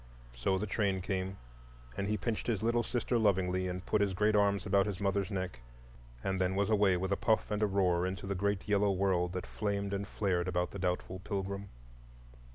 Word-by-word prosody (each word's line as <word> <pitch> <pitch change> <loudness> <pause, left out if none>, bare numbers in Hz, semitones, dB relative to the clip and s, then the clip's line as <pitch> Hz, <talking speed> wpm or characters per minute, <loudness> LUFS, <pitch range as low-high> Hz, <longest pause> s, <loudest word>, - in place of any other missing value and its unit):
So 95 +11 +1
the 100 - -2
train 100 -2 0
came, 95 0 -2 0.6
and 100 - -2
he 105 0 0
pinched 110 +2 -2
his 110 -4 0
little 120 +1 +2
sister 120 0 0
lovingly, 95 -3 +2
and 90 0 -4
put 105 - +1
his 100 -2 +1
great 105 +2 +3
arms 100 -1 +3
about 100 0 +3
his 100 -3 -3
mother's 100 -1 0
neck, 95 - -3 0.6
and 95 -1 -1
then 95 +1 +1
was 100 +2 +1
away 100 -3 +4
with 95 +2 -2
a - - +4
puff 110 +1 +1
and 105 0 0
a 105 - +4
roar 90 -3 +2
into 95 0 -4
the 100 - -1
great 100 +1 -1
yellow 105 0 +3
world 90 -2 +1
that 90 - -3
flamed 100 -2 -2
and 100 0 -2
flared 90 -5 0
about 90 0 0
the 100 - -6
doubtful 90 0 -2
pilgrim. 100 0 -4
100 Hz, 205 wpm, -32 LUFS, 95-105 Hz, 0.6 s, away